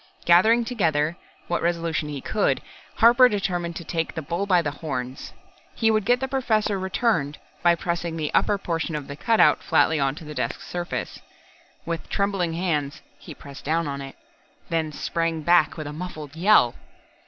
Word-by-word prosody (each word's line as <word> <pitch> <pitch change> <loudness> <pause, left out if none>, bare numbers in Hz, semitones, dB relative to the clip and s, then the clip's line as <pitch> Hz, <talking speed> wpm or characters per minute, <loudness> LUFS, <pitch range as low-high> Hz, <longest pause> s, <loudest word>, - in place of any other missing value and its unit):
Gathering 220 +8 +5
together 165 - 0 0.3
what 175 - -1
resolution 165 -3 -1
he 145 -2 -5
could, 210 +7 0 0.4
Harper 240 +2 +6
determined 175 -5 -2
to 170 - -6
take 165 0 -3
the 160 - -4
bull 170 +7 -2
by 180 -3 +4
the 145 - -2
horns. 130 -4 -5 0.4
He 225 -1 +2
would 215 -2 +1
get 245 +2 +3
the 265 - -2
Professor 220 -6 0
returned 185 -6 0 0.2
by 175 0 +4
pressing 170 -1 -3
the 155 -2 -3
upper 205 - +3
portion 165 -4 -3
of 150 -2 -5
the 140 - -7
cutout 175 -3 +3
flatly 160 -1 +2
onto 140 +3 -1
the 150 - -7
desk - - -3
surface. 175 -1 -5 0.7
With 165 -1 -4
trembling 195 -4 0
hands, 155 -5 -2 0.2
he - - -10
pressed 140 -1 -12
down 165 +2 0
on 140 -1 -4
it 135 0 -9 0.5
then 160 -2 -1
sprang 165 +1 -2
back 170 -2 +3
with 155 - -5
a 145 - -6
muffled 155 -3 -7
yell. 170 - +4
170 Hz, 170 wpm, -24 LUFS, 150-195 Hz, 0.7 s, Harper